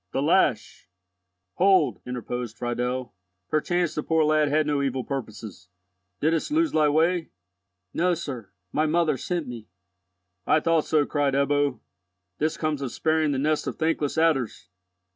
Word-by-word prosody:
The -, -, 0 dB
lash—" -, -, +1 dB, 0.7 s
"Hold," 190 Hz, +1 st, +3 dB
interposed 125 Hz, -1 st, -5 dB
Friedel. 125 Hz, +1 st, -2 dB, 0.4 s
"Perchance 175 Hz, +2 st, 0 dB
the 150 Hz, -, -2 dB
poor 160 Hz, +1 st, +2 dB
lad 155 Hz, 0 st, +3 dB
had 155 Hz, +2 st, +2 dB
no 145 Hz, -1 st, 0 dB
evil 135 Hz, -2 st, -1 dB
purposes. 110 Hz, -8 st, -7 dB, 0.5 s
Didst 160 Hz, -, +1 dB
lose 320 Hz, +1 st, +2 dB
thy 155 Hz, -1 st, +3 dB
way?" 165 Hz, +3 st, +1 dB, 0.6 s
"No, 180 Hz, +1 st, +2 dB
sir, 130 Hz, -, -6 dB, 0.2 s
my 155 Hz, +1 st, +1 dB
mother 165 Hz, -1 st, +2 dB
sent 170 Hz, +3 st, -3 dB
me." 115 Hz, -3 st, -8 dB, 0.8 s
"I -, -, +4 dB
thought 165 Hz, 0 st, +2 dB
so," 150 Hz, -2 st, +2 dB
cried 145 Hz, -2 st, 0 dB
Ebbo. 140 Hz, -2 st, +1 dB, 0.6 s
"This 155 Hz, +1 st, 0 dB
comes 155 Hz, -3 st, -1 dB
of 135 Hz, -3 st, -3 dB
sparing 155 Hz, -1 st, +1 dB
the 140 Hz, -, -1 dB
nest 150 Hz, +3 st, 0 dB
of -, -, -3 dB
thankless 160 Hz, -2 st, 0 dB
adders!" 135 Hz, -, +1 dB
150 Hz, 145 wpm, -25 LUFS, 130-160 Hz, 0.8 s, I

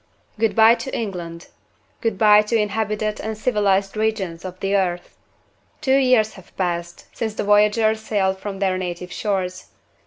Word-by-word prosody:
Good 225 Hz, -1 st, +1 dB
by 225 Hz, 0 st, +7 dB
to 265 Hz, +2 st, -4 dB
England! 175 Hz, -6 st, -5 dB, 0.6 s
Good 225 Hz, -4 st, -1 dB
by 210 Hz, 0 st, +6 dB
to 210 Hz, +2 st, -2 dB
inhabited 215 Hz, 0 st, -1 dB
and 220 Hz, 0 st, -4 dB
civilized 205 Hz, -4 st, +1 dB
regions 210 Hz, -6 st, -2 dB
of 185 Hz, -1 st, -8 dB
the 195 Hz, +1 st, 0 dB
earth! 175 Hz, -3 st, -1 dB, 0.6 s
Two 270 Hz, -3 st, +2 dB
years 250 Hz, -5 st, +3 dB
have 190 Hz, -, -17 dB
passed 175 Hz, -2 st, -3 dB
since 220 Hz, -2 st, -3 dB
the -, -, -2 dB
voyagers 210 Hz, +2 st, +3 dB
sailed 190 Hz, -3 st, -1 dB
from 200 Hz, 0 st, -6 dB
their 190 Hz, -1 st, 0 dB
native 180 Hz, 0 st, -5 dB
shores. 185 Hz, -3 st, -3 dB
205 Hz, 155 wpm, -21 LUFS, 185-220 Hz, 0.6 s, by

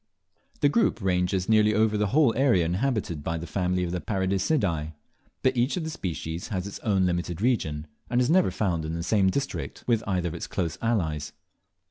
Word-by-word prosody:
The 145 Hz, -, +5 dB
group 145 Hz, -, +2 dB
ranges 90 Hz, -1 st, 0 dB
nearly 110 Hz, -1 st, +4 dB
over 110 Hz, 0 st, +3 dB
the 105 Hz, 0 st, +1 dB
whole 135 Hz, +2 st, +4 dB
area 120 Hz, -10 st, +3 dB
inhabited 90 Hz, -, -1 dB
by 80 Hz, +2 st, -2 dB
the 85 Hz, -, -5 dB
family 90 Hz, +1 st, -1 dB
of 85 Hz, -, -2 dB
the 90 Hz, -1 st, -2 dB
Paradiseidae, 95 Hz, -, 0 dB, 0.5 s
but 130 Hz, -, +3 dB
each 125 Hz, +7 st, +1 dB
of 175 Hz, -, -2 dB
the 160 Hz, -, -4 dB
species 85 Hz, -, -4 dB
has 95 Hz, -4 st, -3 dB
its 100 Hz, -, -7 dB
own 100 Hz, -4 st, +1 dB
limited 85 Hz, -1 st, -1 dB
region, 80 Hz, -11 st, 0 dB, 0.2 s
and 120 Hz, -, +2 dB
is 125 Hz, -, +3 dB
never 180 Hz, +4 st, +4 dB
found 85 Hz, -6 st, -1 dB
in 80 Hz, +1 st, -3 dB
the 85 Hz, -, -3 dB
same 95 Hz, +1 st, +3 dB
district 140 Hz, +7 st, -3 dB
with 115 Hz, -2 st, +1 dB
either 90 Hz, -3 st, 0 dB
of -, -, -7 dB
its 85 Hz, -, -5 dB
close 85 Hz, -5 st, -2 dB
allies. 80 Hz, -10 st, -1 dB
95 Hz, 195 wpm, -26 LUFS, 85-115 Hz, 0.5 s, The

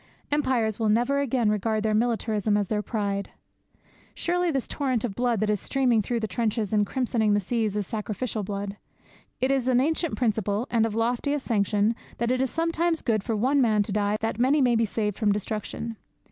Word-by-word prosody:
Empires 255 Hz, -7 st, +1 dB
will 220 Hz, -1 st, +1 dB
never 240 Hz, +6 st, +2 dB
again 255 Hz, -4 st, +1 dB
regard 215 Hz, +1 st, 0 dB
their 215 Hz, -1 st, +1 dB
militarism 215 Hz, -2 st, +1 dB
as 205 Hz, -2 st, -1 dB
their 210 Hz, -1 st, 0 dB
pride. 200 Hz, -3 st, -2 dB, 0.9 s
Surely 355 Hz, 0 st, 0 dB
this 270 Hz, -5 st, -1 dB
torrent 260 Hz, -6 st, -1 dB
of 235 Hz, -5 st, -2 dB
blood 240 Hz, -1 st, 0 dB
that 215 Hz, -, 0 dB
is 210 Hz, -, 0 dB
streaming 250 Hz, -3 st, +2 dB
through 235 Hz, +3 st, -2 dB
the 220 Hz, -, -2 dB
trenches 215 Hz, +1 st, -1 dB
and 210 Hz, -1 st, +3 dB
crimsoning 230 Hz, -5 st, +1 dB
the -, -, +3 dB
seas 215 Hz, +1 st, -1 dB
is 205 Hz, -1 st, -1 dB
sacrificial 215 Hz, +2 st, -3 dB
blood! 200 Hz, 0 st, -4 dB, 0.6 s
It 260 Hz, +1 st, +2 dB
is 265 Hz, -2 st, +1 dB
an 250 Hz, -1 st, +4 dB
ancient 320 Hz, +4 st, 0 dB
principle, 215 Hz, -2 st, 0 dB
and 225 Hz, -1 st, +3 dB
of 215 Hz, -, -5 dB
loftiest 245 Hz, +5 st, 0 dB
sanction, 210 Hz, 0 st, +1 dB, 0.2 s
that 235 Hz, +1 st, 0 dB
it 255 Hz, 0 st, +1 dB
is 265 Hz, -, +1 dB
sometimes 330 Hz, +1 st, 0 dB
good 215 Hz, -4 st, +1 dB
for 225 Hz, 0 st, -1 dB
one 265 Hz, +6 st, +2 dB
man 215 Hz, -4 st, +3 dB
to 205 Hz, -, -6 dB
die 205 Hz, +1 st, +1 dB
that 225 Hz, 0 st, -2 dB
many 270 Hz, +5 st, +4 dB
may 250 Hz, -3 st, +3 dB
be 225 Hz, 0 st, +3 dB
saved 210 Hz, -1 st, -2 dB
from 215 Hz, -3 st, +3 dB
destruction. 215 Hz, +2 st, -4 dB
225 Hz, 200 wpm, -26 LUFS, 210-255 Hz, 0.9 s, an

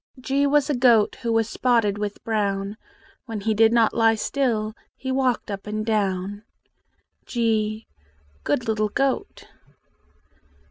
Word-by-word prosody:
G 275 Hz, +2 st, +1 dB
was 290 Hz, 0 st, +3 dB
a 295 Hz, -, 0 dB
goat 240 Hz, -4 st, +4 dB
Who 235 Hz, -2 st, -1 dB
was 225 Hz, -1 st, +2 dB
spotted 230 Hz, -4 st, +1 dB
with 205 Hz, -1 st, -4 dB
brown: 200 Hz, -2 st, -1 dB, 0.5 s
When 220 Hz, -3 st, -5 dB
he 220 Hz, +2 st, +1 dB
did 220 Hz, +1 st, +4 dB
not 230 Hz, -2 st, +3 dB
lie 225 Hz, -1 st, +4 dB
still 220 Hz, -3 st, -1 dB, 0.2 s
He 260 Hz, -, -5 dB
walked 260 Hz, -5 st, 0 dB
up 200 Hz, +1 st, -6 dB
and 215 Hz, 0 st, -3 dB
down. 200 Hz, -2 st, -1 dB, 0.9 s
g 220 Hz, -2 st, 0 dB, 0.6 s
Good 230 Hz, +11 st, -1 dB
little 215 Hz, -1 st, 0 dB
goat! 275 Hz, +4 st, -2 dB
220 Hz, 135 wpm, -23 LUFS, 210-245 Hz, 0.9 s, goat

